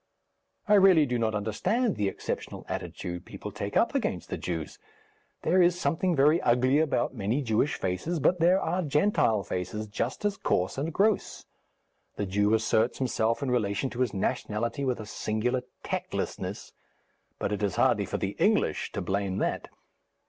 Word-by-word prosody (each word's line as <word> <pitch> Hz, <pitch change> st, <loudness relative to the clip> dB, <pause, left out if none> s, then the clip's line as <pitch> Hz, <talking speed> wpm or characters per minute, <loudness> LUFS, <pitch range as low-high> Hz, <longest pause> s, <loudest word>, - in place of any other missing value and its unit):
I 210 Hz, -, +4 dB
really 190 Hz, -6 st, +6 dB
do 125 Hz, -2 st, -1 dB
not 110 Hz, -1 st, 0 dB
understand 200 Hz, -, 0 dB
the 105 Hz, -, 0 dB
exceptional -, -, -5 dB
attitude 90 Hz, 0 st, -5 dB
people 105 Hz, -, -8 dB
take 100 Hz, 0 st, -3 dB
up -, -, +3 dB
against -, -, -2 dB
the -, -, 0 dB
Jews. 80 Hz, -3 st, -4 dB, 0.6 s
There 180 Hz, +3 st, +4 dB
is 175 Hz, 0 st, +3 dB
something 175 Hz, +1 st, +1 dB
very 150 Hz, +4 st, +4 dB
ugly 130 Hz, +4 st, +3 dB
about 145 Hz, -6 st, +1 dB
many 115 Hz, +5 st, -1 dB
Jewish 115 Hz, +5 st, +1 dB
faces, 95 Hz, -, -2 dB
but 180 Hz, +5 st, +2 dB
there 180 Hz, +3 st, +4 dB
are 180 Hz, 0 st, -1 dB
Gentile 150 Hz, -, +2 dB
faces 90 Hz, +5 st, -4 dB
just 115 Hz, -, -3 dB
as 205 Hz, -1 st, 0 dB
coarse 90 Hz, -, 0 dB
and 155 Hz, +4 st, -2 dB
gross. 205 Hz, +4 st, 0 dB, 0.7 s
The 105 Hz, -, -2 dB
Jew 105 Hz, +3 st, +2 dB
asserts 110 Hz, +1 st, +1 dB
himself 115 Hz, -1 st, 0 dB
in 130 Hz, -, -1 dB
relation 115 Hz, +1 st, 0 dB
to 125 Hz, -, -7 dB
his 125 Hz, -4 st, +1 dB
nationality 110 Hz, +6 st, -2 dB
with 125 Hz, -3 st, 0 dB
a 110 Hz, -, -6 dB
singular 110 Hz, +4 st, -1 dB, 0.2 s
tactlessness, -, -, -4 dB, 0.7 s
but -, -, -2 dB
it 105 Hz, -, -2 dB
is 100 Hz, -3 st, 0 dB
hardly -, -, +3 dB
for -, -, -3 dB
the -, -, -3 dB
English -, -, +2 dB
to -, -, -2 dB
blame 95 Hz, -1 st, -1 dB
that. -, -, -1 dB
120 Hz, 165 wpm, -28 LUFS, 105-160 Hz, 0.7 s, really